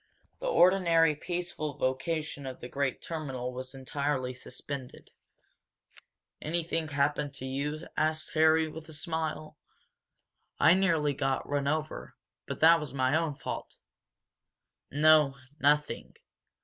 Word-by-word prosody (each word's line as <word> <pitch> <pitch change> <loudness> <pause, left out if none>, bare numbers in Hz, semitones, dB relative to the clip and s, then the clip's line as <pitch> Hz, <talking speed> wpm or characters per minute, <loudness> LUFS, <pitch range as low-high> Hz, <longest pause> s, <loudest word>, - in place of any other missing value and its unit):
The - - -4
ordinary 175 - +5
peaceful 170 -3 -3
vocation 140 +2 -2
of 130 - -7
the - - -7
great 140 0 -2
terminal 135 -6 -4
was 130 +1 -7
entirely 135 -1 -2
suspended. 130 +1 -8 1.3
"Anything 165 0 -1
happen 145 0 0
to 135 -1 -8
you?" 145 +4 -3
asked 155 0 0
Harry 160 0 +4
with 160 +1 -9
a - - -8
smile. 155 0 -4 1.0
"I 160 - +7
nearly 165 -6 +2
got 135 -1 -1
run 140 -1 -1
over 155 +1 -3 0.3
but - - -5
that 165 +1 +7
was 150 -3 -6
my 130 +2 +2
own 160 -2 0
fault." 135 - -6 1.1
"No, 150 -1 +5 0.2
nothing. 150 +1 +1
150 Hz, 120 wpm, -30 LUFS, 135-160 Hz, 1.3 s, I